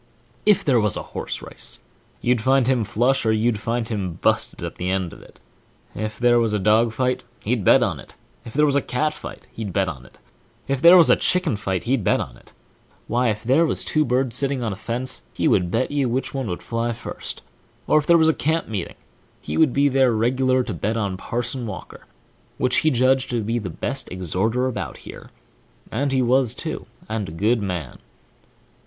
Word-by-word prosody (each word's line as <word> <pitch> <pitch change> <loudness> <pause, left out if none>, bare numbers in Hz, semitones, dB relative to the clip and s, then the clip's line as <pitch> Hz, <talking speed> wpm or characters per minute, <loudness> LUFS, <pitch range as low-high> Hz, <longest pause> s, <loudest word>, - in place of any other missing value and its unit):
If 210 -3 +4
there 130 -5 +4
was 105 -3 +1
a - - -4
horse - - -4
race, - - -6 0.4
you'd 120 -2 +1
find 130 +1 +3
him 130 -3 +2
flush, 120 +6 +1
or 110 - +2
you'd 110 0 +1
find 115 +1 -2
him 95 -7 -3
busted - - +1
at - - -6
the 90 - -2
end 95 -2 -1
of - - -13
it; - - -18 0.5
if 110 0 -4
there 120 0 +4
was 115 -2 +1
a - - +2
dogfight, 115 +5 +2 0.2
h!! - - -11
e'd 115 -3 0
bet 130 +7 +6
on 90 - -1
it; - - -14 0.3
if 115 - -10
there 150 +2 +4
was 140 -2 +2
a 140 - +3
cat 150 +5 -1
fight, - - -10
he'd 110 -3 -5
bet 95 +1 +1
on 70 -7 -6
it; 65 - -19 0.5
if 135 -1 -1
there 175 +2 +9
was 170 - +7
a - - +7
chicken 180 - +1
fight, 95 -3 -2
he'd 125 -2 0
bet - - +2
on - - -5
it; - - -20 0.5
why, 120 +2 +1
if 105 -1 -3
there 135 +8 +4
was 165 - +1
two 155 - +2
birds 125 -2 0
setting 135 -1 -1
on 110 -3 -1
a - - -6
fence, 115 - -3
he - - +1
would 90 -2 +2
bet 115 +9 0
you 140 -3 0
which 130 +3 -2
one 135 -3 -3
would 90 -3 -5
fly 115 0 -2
first; - - -7 0.4
or 155 - +4
if 150 - -5
there 170 - +6
was 160 -1 +4
a 160 - +4
camp 160 +3 -1
meeting, 100 -5 -4 0.4
he - - -5
would 160 -5 +4
be 140 +2 +3
there 135 -2 +3
reg'lar, 130 +3 +2
to 120 -4 -4
bet 105 +7 -2
on 100 -4 -1
Parson 120 +5 -3
Walker, 95 -4 -9 0.5
which 125 0 +2
he 155 - +3
judged 130 0 +2
to 120 -3 -1
be 115 +3 -1
the 100 -5 -5
best 130 +10 -4
exhorter 95 +7 0
about 105 - -4
here, - - -10 0.6
and 140 +5 0
so - - +1
he 130 - +3
was, 125 -1 +2
too, - - -5 0.2
and 110 -4 -3
a - - -8
good 105 +8 +1
man. 90 -8 -4
120 Hz, 220 wpm, -22 LUFS, 105-130 Hz, 0.6 s, there